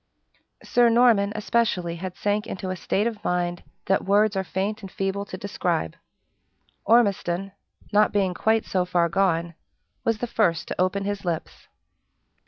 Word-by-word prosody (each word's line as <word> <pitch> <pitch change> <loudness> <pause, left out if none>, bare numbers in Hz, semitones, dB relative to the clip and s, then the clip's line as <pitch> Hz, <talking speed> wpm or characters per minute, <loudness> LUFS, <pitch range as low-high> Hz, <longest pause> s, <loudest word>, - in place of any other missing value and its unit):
Sir 240 -1 +4
Norman, 230 -4 +4
especially, 210 -6 0
had 185 +1 -6
sank 205 +1 -1
into 185 0 -4
a - - -2
state 195 +3 -1
of 225 -3 -3
mind 175 0 -1 0.2
that 195 - +1
words 205 +1 +3
are 190 - 0
faint 195 +5 -3
and 195 - -8
feeble 195 +1 -2
to 185 - -7
describe. 175 - -2 0.9
Ormiston, 195 -5 +2 0.4
not 210 +1 +4
being 195 -3 +1
quite 220 +4 +1
so 185 -1 0
far 175 -1 +1
gone, 170 -2 +1 0.5
was 230 -1 +1
the 245 - -2
first 170 -9 0
to - - -2
open 195 +2 0
his 205 0 -3
lips. 170 -3 -4
195 Hz, 155 wpm, -24 LUFS, 180-210 Hz, 0.9 s, Sir